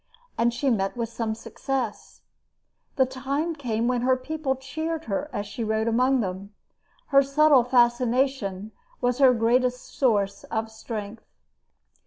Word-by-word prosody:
And 235 +1 +2
she 255 +3 0
met 195 0 -1
with 230 -2 -2
some 230 -1 -3
success. 270 +3 -5 0.7
The 265 - +4
time 275 +6 -2
came 235 -5 -1
when 250 -1 +1
her 255 +1 +3
people 280 0 -2
cheered 315 +5 -4
her 225 +9 -2
as 205 -5 -3
she 220 +3 -5
rode 220 +1 0
among 255 +3 +3
them. 195 +1 -5 0.5
Her 275 - +6
subtle 275 -1 +4
fascination 240 -4 +1 0.3
was 245 +1 0
her 265 -2 +7
greatest 250 +2 +1
source 200 -6 +1
of 225 0 -3
strength. 220 -1 -7
245 Hz, 140 wpm, -25 LUFS, 220-265 Hz, 0.7 s, her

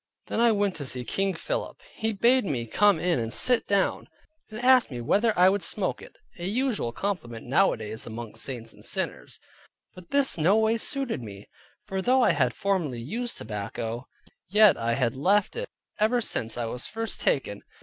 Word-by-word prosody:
Then - - -3
I 235 0 +5
went 205 -3 0
to 145 - -5
see 125 -1 -3
King 195 +5 -1
Philip. - - -4
He 220 0 -2
bade 240 +5 +3
me 125 -9 -2
come 200 - +3
in 175 -6 +1
and 115 -1 -3
sit 250 - +4
down, 200 -1 +1 0.4
and 215 +1 -7
asked 255 0 +5
me 125 -4 -6
whether 210 - +2
I 180 +1 +6
would 200 +1 +2
smoke 185 +2 -1
it - - -14 0.2
(a 175 - -3
usual 230 - -1
compliment 120 - -4
nowadays 125 - 0
amongst 115 0 -7
saints 115 -4 -6
and - - -15
sinners) - - -5 0.5
but 180 -2 -14
this 280 -9 +2
no 185 +7 +4
way 220 +1 +2
suited 265 - -1
me. 100 -3 -10 0.4
For 190 -2 -3
though 255 +5 +3
I - - +5
had 130 -4 +1
formerly 175 -11 -1
used 230 - -4
tobacco, 110 +3 -5 0.4
yet 210 +1 +6
I 115 0 -1
had 120 -1 0
left 195 +9 +2
it - - -4 0.3
ever 220 +4 +3
since 115 - -2
I 120 - -2
was 120 +2 -5
first 225 +1 -5
taken. 105 -7 0
190 Hz, 185 wpm, -26 LUFS, -, 0.5 s, I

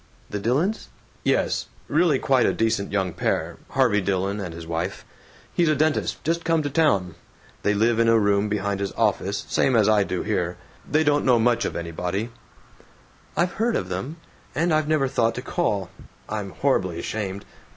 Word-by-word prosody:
"The 105 - -2
Dillons?" 140 - 0 0.4
"Yes. - - +1 0.2
Really 160 -6 +3
quite 130 -2 +3
a - - +2
decent 110 -3 0
young 95 -4 0
pair - - -1
Harvey 120 -6 +3
Dillon 95 +1 -1
and 90 -4 -4
his 85 0 -8
wife. 85 +3 -3 0.5
He's 170 -2 +2
a 155 - +3
dentist, 155 +1 0
just 165 +2 0
come 165 -1 +2
to 145 - -3
town. 100 - +2 0.5
They 105 - +1
live 115 +2 +2
in 115 - +4
a 115 0 +5
room 100 -1 +2
behind 100 -1 -1
his 100 -1 -2
office, 100 -2 0
same 130 - +2
as 110 -3 +4
I 105 -2 +4
do 95 -2 -3
here. 90 0 -1 0.3
They 155 +1 +3
don't 145 -1 +2
know 125 -2 +4
much 120 +1 +2
of - - -3
anybody 90 +6 -3 0.5
" - - -29
"I've 175 +3 +2
heard 235 0 +2
of 90 - -2
them. 95 - -4 0.4
And 165 +3 +2
I've 155 -1 +2
never 150 -3 +2
thought 115 -3 +1
to 125 - -5
call. 100 - -1 0.4
I'm 105 -2 -4
horribly 95 -9 0
ashamed. 100 +1 -4
110 Hz, 180 wpm, -24 LUFS, 95-145 Hz, 0.5 s, a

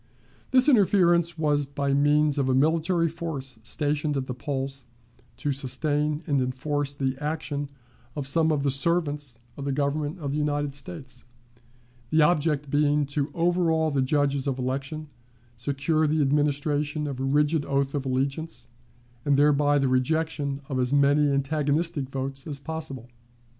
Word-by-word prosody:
This 255 +1 +5
interference 175 - +4
was 145 -2 +1
by 140 0 -1
means 145 +1 +3
of 135 -1 +1
a 130 - +3
military 165 +4 +2
force 145 -7 -5
stationed 145 +4 -1
at 135 - -2
the 130 - -4
polls 135 0 -4 0.5
to 145 - -1
sustain 150 +3 0
and 140 -4 +1
enforce 140 +3 -2
the 135 -1 -1
action 150 -2 -3 0.5
of 145 - -3
some 160 +3 +2
of 145 -2 0
the 140 - +2
servants 145 -3 0 0.2
of 140 - -5
the 140 - -1
Government 145 +3 -1
of 145 -5 -4
the 150 - -1
United 145 -1 -1
States, 135 -4 -6 0.9
the 155 0 +4
object 150 -3 +1
being 145 0 +2
to 145 0 0
overawe 165 -2 +2
the 140 -2 +1
judges 140 0 +1
of 135 -2 -1
election, 135 +4 -3 0.5
secure 140 +5 0
the 155 +1 +1
administration 145 +1 0
of 140 -3 -4
a - - -2
rigid 150 +3 +2
oath 140 -1 0
of 145 -2 -1
allegiance, 135 +1 -2 0.5
and 140 -2 +2
thereby 145 0 +4
the 135 -1 +2
rejection 140 +2 0
of 130 -2 -2
as 125 0 0
many 145 +1 +4
antagonistic 145 +1 0
votes 135 +1 -5
as 145 -2 -3
possible. 140 -4 -6
145 Hz, 155 wpm, -26 LUFS, 135-155 Hz, 0.9 s, This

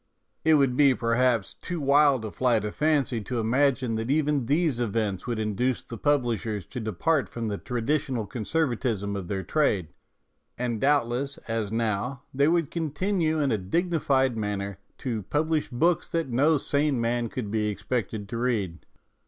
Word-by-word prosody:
It 160 0 +5
would 135 -4 +3
be, 140 -1 +5
perhaps, 115 -2 +1
too 175 -2 -5
wild 140 -3 +4
a 110 - -5
flight 115 -4 +1
of 105 - -4
fancy 145 -6 +1
to 120 +3 -3
imagine 125 +1 +2
that 115 +2 -3
even 145 -3 +1
these 145 -4 +2
events 110 -3 -1
would 120 -2 -1
induce 110 +4 -1
the 115 - -8
publishers 115 - 0
to 125 - -3
depart 120 - 0
from 115 0 -4
the 100 - -3
traditional 125 -1 -1
conservatism 120 -5 -1
of 95 -3 -5
their 95 0 -2
trade, 100 - +1 0.7
and 120 -3 -2
doubtless, 140 -1 +1
as 110 -2 -2
now, 115 +3 -1
they 140 +2 +3
would 165 -2 +1
continue 165 +1 0
in 145 -2 +1
a 110 - +1
dignified 135 - +1
manner 100 -2 -3 0.2
to 115 -5 -3
publish 155 - 0
books 165 +7 +1
that 165 -4 0
no 145 +6 +3
sane 145 -1 +1
man 115 0 0
could 105 -5 -5
be 105 -1 0
expected 105 0 -3
to 115 - -4
read. 105 -9 -2
125 Hz, 160 wpm, -26 LUFS, 110-145 Hz, 0.7 s, It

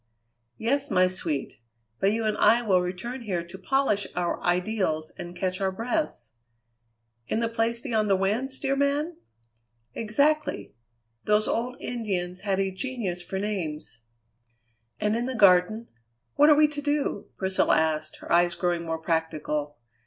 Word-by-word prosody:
"Yes, 275 +5 0
my 185 0 +4
sweet, 160 -10 -4 0.4
but 195 - +3
you 225 +1 -1
and 215 -1 +1
I 240 +1 +5
will 190 -5 +3
return 190 +9 -4
here 185 -7 -2
to 175 +3 -10
polish 210 -2 +1
our 175 -1 -1
ideals 175 -4 0
and 175 0 -8
catch 185 +1 -2
our 190 -1 +1
breaths." 230 - -2 1.0
"In - - 0
the 230 - +1
Place 230 0 0
Beyond 220 -3 0
the 195 - +5
Winds, 230 +8 0
dear 275 -1 0
man?" 290 +4 0 0.8
"Exactly! 280 - +1 0.5
Those 210 0 +3
old 245 +2 -1
Indians 190 -7 -3
had 195 -1 -1
a 195 -1 0
genius 195 -4 -3
for 190 +2 -5
names." 170 - -4 1.0
"And 210 +1 +1
in 235 +1 -1
the 260 0 -3
Garden 200 +2 +4 0.5
what 295 +1 +6
are 300 - +8
we 305 +1 +6
to 295 -1 -5
do?" 290 -7 -1
Priscilla 190 0 +2
asked, 155 -1 0
her - - -9
eyes 175 0 +4
growing 175 -1 0
more 165 -1 -2
practical. 155 -2 -2
200 Hz, 150 wpm, -26 LUFS, 175-240 Hz, 1.0 s, are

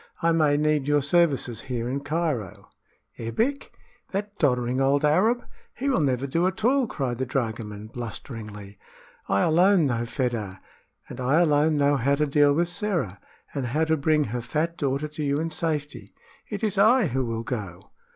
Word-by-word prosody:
I 165 - +4
may 155 -3 +3
need 150 -2 +1
your 145 -1 +3
services 145 -6 +2
here 120 -3 -4
in 135 +3 -2
Cairo." 145 - -3 0.5
"Ebbek! 225 - -2 0.4
that 205 +1 -3
doddering 125 -2 +1
old 140 +2 +3
Arab! 215 +11 +2 0.3
He 275 +2 -2
will 260 - +2
never 135 -3 0
do 165 +6 +1
at 190 +3 -3
all," 260 0 +3
cried 125 - -3
the 130 - 0
dragoman, 110 -5 -3
blusteringly. 110 -3 -8 0.5
"I 100 - +2
alone 175 +2 +4
know 120 -3 -1
Fedah, 115 -7 -3 0.5
and - - -9
I 135 +6 +3
alone 155 -1 +3
know 145 0 +3
how 140 +3 +2
to 150 +1 +1
deal 145 0 +4
with 170 +4 +2
Sĕra, 170 - -2 0.3
and 135 -4 -2
how 150 +7 0
to 160 0 +2
bring 155 0 +2
her 120 -1 -3
fat 160 +7 -2
daughter 140 -1 -1
to 150 0 -6
you 140 0 0
in 165 +1 -2
safety. 145 - -3 0.3
It 210 +1 -5
is 205 -3 0
I 225 +3 +5
who 130 -4 -1
will 115 -1 -3
go!" 100 -5 -6
145 Hz, 175 wpm, -25 LUFS, 120-165 Hz, 0.5 s, I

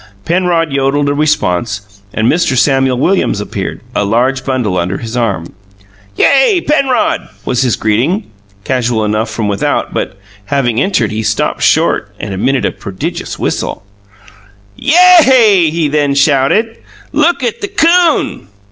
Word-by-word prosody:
Penrod 170 -2 0
yodelled 140 +1 0
a - - +1
response; 100 - -2
and 110 +2 0
Mr. 150 -3 +1
Samuel 135 -1 +2
Williams 175 - +1
appeared, 105 - -5
a - - 0
large 125 +6 0
bundle 125 -9 -1
under 90 +2 -2
his 115 0 -7
arm. 100 -9 -2 0.6
"Yay, 285 +8 +4
Penrod!" 275 -6 0 0.2
was 125 - 0
his 125 -4 +1
greeting, 125 - 0 0.4
casual 120 -3 -1
enough 110 +2 -1
from 110 -3 -3
without; 100 -1 -1
but, - - -4 0.3
having 125 -1 0
entered, 185 - 0
he 110 +1 -3
stopped - - -1
short - - +1
and 100 - -5
emitted 130 +8 0
a - - 0
prodigious 95 -1 -6
whistle. - - -3 0.9
"YA 295 - 0 0.3
A 215 -10 +5
AY!" - - +1
he 160 0 -1
then 145 -1 0
shouted. 145 - +1 0.3
"Look 300 0 +1
at 235 -3 -2
the 405 - -2
'coon!" 345 - +1
135 Hz, 145 wpm, -13 LUFS, 110-185 Hz, 0.9 s, A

